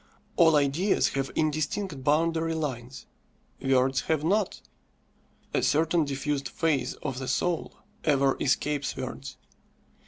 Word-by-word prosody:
All 165 -3 +6
ideas 150 +7 +2
have 135 0 -2
indistinct 155 0 -1
boundary 165 +3 +1
lines, 130 -5 -4 0.6
words 135 0 +2
have 155 -2 +1
not. 200 +4 +1 0.9
A - - +2
certain 165 +1 +2
diffused 140 0 -2
phase 150 -6 0
of 130 -1 -3
the 130 - -5
soul 175 +3 -1 0.3
ever 140 -3 +3
escapes 145 -1 0
words. 130 +1 -6
150 Hz, 115 wpm, -27 LUFS, 135-165 Hz, 0.9 s, All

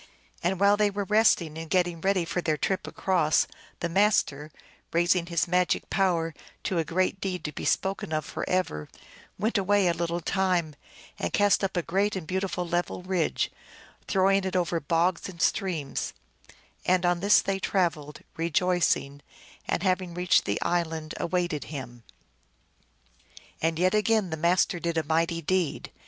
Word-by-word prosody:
And 180 +1 0
while 200 +1 +5
they 210 0 +3
were 200 0 -3
resting 195 -7 +2
and 165 -1 -7
getting 175 -3 +1
ready 190 -2 +1
for 175 - -2
their 155 -3 0
trip 190 +5 -1
across, 170 -5 +2 0.4
the 170 - 0
Master, 170 -6 +1 0.4
raising 175 +1 +2
his 170 -2 0
magic 180 +1 +1
power 170 -4 +1 0.3
to 185 -4 0
a - - +2
great 185 +4 -1
deed 180 -4 -3
to 150 - -3
be - - -6
spoken 190 -4 0
of 155 -1 -1
forever, 165 - -2 0.5
went 215 +2 +1
away 200 0 +2
a 170 - +3
little 170 +1 -2
time, 180 -3 0 0.5
and 85 - -2
cast 205 0 +3
up 190 -1 -1
a 175 - +1
great 195 +5 0
and 185 -4 -4
beautiful 185 0 -2
level 175 +1 -2
ridge, 185 -3 0 0.6
throwing 195 0 +3
it 190 -1 -3
over 175 -2 +1
bogs 170 +5 0
and 175 -3 -11
streams; 170 -6 -1 0.7
and 180 0 +2
on 175 0 +2
this 200 +3 +5
they 195 0 -1
traveled, 165 -7 -1 0.2
rejoicing, 165 -4 +1 0.5
and, 175 - -1
having 185 -2 0
reached 180 0 +3
the 100 - 0
isl 170 -2 0
and, 160 -1 -6
awaited 175 -4 -1
him. 130 -5 -8 1.6
And 160 0 +1
yet 185 +3 +2
again 215 -3 +2
the - - -1
Master 175 +2 +2
did 170 -1 -2
a 160 - +1
mighty 165 +2 0
deed. 180 -1 -1
175 Hz, 160 wpm, -27 LUFS, 165-190 Hz, 1.6 s, while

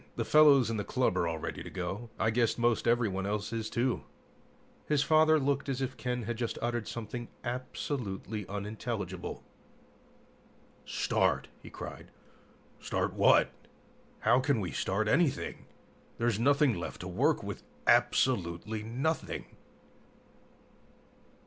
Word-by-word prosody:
The - - -2
fellows 140 -6 +6
in 110 - -1
the 105 - -1
club 125 -6 +1
are 85 -2 +1
all 80 -1 -2
ready - - -5
to - - -7
go. 95 +5 -4
I 110 - +2
guess 115 0 +2
most 120 -1 +1
everyone 105 -5 +1
else 105 +1 -2
is, 110 -1 -2
too." 125 +1 0 0.9
His 150 -2 +3
father 155 +1 +5
looked 140 0 0
as 135 -1 -1
if 130 -2 -2
Ken 125 -1 -2
had 115 +1 -3
just 120 -1 -2
uttered 120 -2 -2
something 120 +1 -5 0.2
absolutely 115 -5 -4
unintelligible. 100 -2 -4 1.4
"Start!" - - +1
he - - -11
cried. - - -8 0.7
"Start - - -1
what? - - +5 0.7
How 120 +3 +4
can 135 -2 +1
we 90 -5 -3
start 100 +9 0
anything? 150 +4 +1 0.5
There's 115 -3 +1
nothing 140 +1 +4
left 85 - -6
to - - -5
work - - +1
with, - - -5 0.2
absolutely 105 -2 +2
nothing!" 130 +9 -3
120 Hz, 130 wpm, -31 LUFS, 105-130 Hz, 1.4 s, fellows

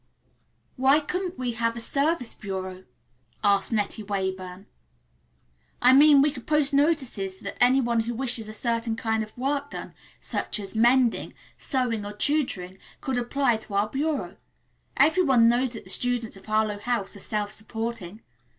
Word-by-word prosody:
"Why 270 +3 +5
couldn't 360 +3 -4
we 250 -1 -2
have 230 0 -1
a - - -5
Service 280 +1 +1
Bureau?" 190 -2 -6 0.6
asked 200 0 +3
Nettie 215 0 -1
Weyburn. 190 -2 -4 1.1
"I 250 +1 +6
mean 285 0 +7
we 295 - +2
could 255 -4 -11
post 300 -2 +3
notices 265 - 0
that 195 - -5
any 260 +2 +5
one 235 -2 +1
who 230 +1 -2
wishes 235 -3 0
a - - -5
certain 230 0 -1
kind 220 -1 -1
of 215 +1 -8
work 280 +2 -1
done, - - -8 0.3
such - - -1
as 200 +1 -7
mending, 240 +1 +3 0.2
sewing 245 -5 -1
or 205 0 -6
tutoring, 210 -8 -1 0.2
could 260 -2 -2
apply 245 -1 +1
to 215 -2 -8
our 205 +1 +1
bureau. 295 +5 -2 0.6
Every 320 +5 +4
one 260 -8 +5
knows 245 +2 +2
that 225 - -8
the - - -3
students 245 -3 0
of 195 - -14
Harlowe 215 -1 0
House 210 -3 -2
are - - -10
self 205 +1 -3
supporting. 220 -2 -5
235 Hz, 160 wpm, -26 LUFS, 210-270 Hz, 1.1 s, mean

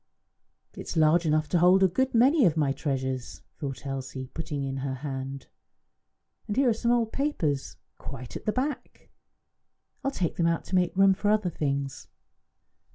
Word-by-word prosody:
"It - - -12
is - - -4
large 160 +2 +4
enough 155 0 +2
to 175 - +2
hold 180 +3 +5
a - - +7
good 260 +8 0
many 265 +6 +5
of 165 -3 +2
my 145 -3 +2
treasures," 130 -2 -3 0.2
thought 140 -1 -5
Elsie, 130 -1 -5
putting 150 -3 -4
in 135 0 -3
her 135 0 -3
hand. 135 0 -5 1.0
"And 210 - -3
here 270 -2 +4
are - - +3
some 235 +2 -1
old 235 -2 +2
papers, 165 - -1 0.2
quite 120 0 -8
at - - -7
the 215 - +2
back! 275 +5 -4 0.9
I - - -1
will - - +1
take 170 -3 -1
them 170 - +2
out 170 0 0
to 190 - -2
make 180 0 +1
room 195 0 +6
for 205 +2 -1
other 210 -4 +2
things." 140 -3 -3
165 Hz, 180 wpm, -27 LUFS, 135-210 Hz, 1.0 s, a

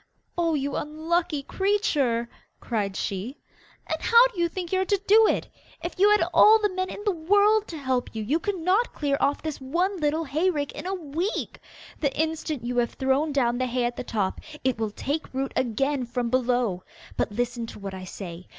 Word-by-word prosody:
'Oh, 335 -2 +1
you 280 -1 -2
unlucky 315 0 -1
creature!' 290 - +1 0.3
cried 205 -5 -2
she; 200 +8 -3 0.5
'and - - -3
how 470 +1 +7
do 370 - -7
you 340 0 +2
think 355 -1 -5
you 375 0 +2
are - - 0
to 400 +1 +1
do 440 +2 +7
it. - - 0 0.4
If 345 +2 -5
you 405 +2 +6
had 420 0 +5
all 435 +1 +8
the 415 -3 0
men 370 0 -2
in 415 - -7
the 410 - +3
world 410 +5 +3
to 330 - -6
help 260 -4 -2
you, 220 - -2
you 285 +10 +1
could 405 +2 -2
not 370 +8 +1
clear 285 -2 0
off 280 +1 +1
this 310 -3 -4
one 350 +9 0
little 305 +1 +1
hay 315 +5 +1
rick 290 -5 -2
in - - -7
a 385 - -1
week. 340 +4 -3 0.4
The 280 -2 -1
instant 315 -5 -2
you 245 0 -2
have 240 -1 +1
thrown 270 +4 +1
down 245 -3 +1
the 255 - 0
hay 250 0 -1
at 240 0 -2
the - - -5
top, 205 -6 -2 0.2
it 255 -3 0
will 220 -1 0
take 285 +9 -3
root 270 0 -1
again 260 +2 0
from 240 -1 -2
below. 245 -7 +1 0.3
But - - -1
listen 240 +1 -2
to - - -9
what 195 -1 -6
I 185 -1 -7
say. 180 -1 -8
290 Hz, 210 wpm, -26 LUFS, 245-360 Hz, 0.5 s, all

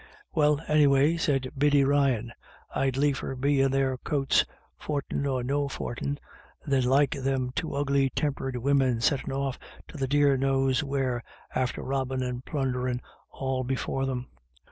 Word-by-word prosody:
" 415 - -30
Well, 150 -1 +3
anyway," 145 0 +4
said 135 -5 0
Biddy 145 0 +4
Ryan, 135 -4 +2 0.2
" - - -25
I'd 135 -1 +1
liefer 140 -1 0
be 140 +1 +2
in 135 - +3
their 135 -1 0
coats, 140 -1 +2 0.4
fortin 140 -1 -2
or 130 -2 -1
no 140 +3 0
fortin, 140 +2 -4 0.5
than 135 -3 +2
like 135 +3 +4
them 135 -2 -1
two 160 - -3
ugly 140 -1 +2
tempered 135 -2 -2
women, 130 -2 +2
settin' 135 +3 +1
off 135 -1 -2 0.3
to - - -9
the 135 - 0
dear 145 0 +4
knows 135 0 +2
where, 135 -4 -1 0.3
after 130 -1 -1
robbin' 130 -1 -1
and 125 0 -4
plunderin' 125 -4 -1 0.3
all 130 -1 -2
be 130 +1 -1
fore 135 +1 -2
them." 125 -1 -3
135 Hz, 160 wpm, -27 LUFS, 130-140 Hz, 0.5 s, anyway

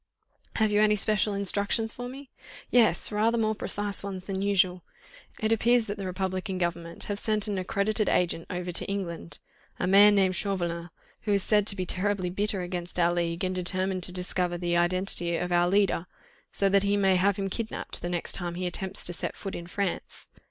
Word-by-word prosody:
"Have 220 -2 +2
you 210 0 +3
any 210 0 +4
special 210 0 +1
instructions 200 +3 +1
for 245 0 -6
me?" 270 +1 -11 0.4
"Yes! 225 -8 +5
rather 220 +3 +1
more 220 -1 +1
precise 205 -1 -1
ones 190 -2 -6
than 195 -1 -3
usual. 185 -3 +2 0.6
It 220 0 0
appears 235 +1 +3
that 205 0 -5
the 195 - -4
Republican 185 0 -3
Government 170 -1 -3
have 205 -1 -4
sent 215 -1 +1
an 200 -2 -2
accredited 200 +3 0
agent 170 -2 0
over 180 0 -4
to 175 - -2
England, 175 - -4 0.4
a - - 0
man 200 +2 +7
named 190 -2 +2
Chauvelin, 175 -4 -1 0.3
who 210 - 0
is 200 -1 +3
said 210 -1 +3
to 200 - +4
be 185 -2 -3
terribly 185 -1 0
bitter 200 0 -1
against 175 -1 -5
our 175 0 +3
league, 170 0 -2
and 185 0 0
determined 185 +1 -1
to 180 - +2
discover 180 -1 -2
the 175 0 -1
identity 175 -1 +1
of 180 +1 -3
our 175 0 +3
leader, 195 -3 +1 0.4
so 195 - +1
that 195 0 +4
he 200 +1 +1
may 195 -2 +3
have 195 +2 +2
him 195 -1 -2
kidnapped, 220 +3 -3
the 175 - -3
next 175 -1 -3
time 175 -2 -3
he 180 +1 -3
attempts 190 +2 -3
to 175 - +4
set - - -4
foot 195 - -6
in 170 - -6
France. 195 0 -4
190 Hz, 200 wpm, -27 LUFS, 180-205 Hz, 0.6 s, man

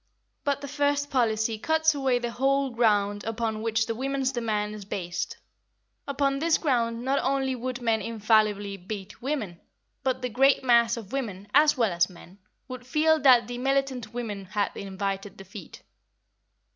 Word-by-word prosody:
But 285 -1 0
the 280 - -6
first 285 0 0
policy 220 -3 +1
cuts 320 +4 +2
away 270 -3 +1
the 240 -1 -3
whole 275 +2 +1
ground 205 -3 +1
upon 225 -1 -2
which 225 0 +1
the 230 - -2
women's 270 +2 -1
demand 215 -4 -2
is 210 -1 -8
based; 175 -3 -4 0.7
upon 275 -1 0
this 325 +1 +3
ground 235 -5 0
not 275 +1 +2
only 270 0 0
would 250 0 -5
men 225 -2 +2
infallibly 215 -3 +1
beat 195 +1 -8
women, 235 - -3 0.4
but 260 -2 -1
the 250 - -1
great 270 +4 +3
mass 235 -2 +4
of 215 -4 -9
women, 205 -7 -4
as 295 +1 +5
well 230 -5 +2
as 175 +1 +2
men, 185 +2 -15 0.3
would 255 -1 -8
feel 315 +3 +3
that 255 -5 +6
the 245 0 -5
militant 270 -2 -1
women 215 -5 -5
had 200 +2 -2
invited 195 0 -4
defeat. 195 -1 -11
235 Hz, 160 wpm, -27 LUFS, 210-270 Hz, 0.7 s, that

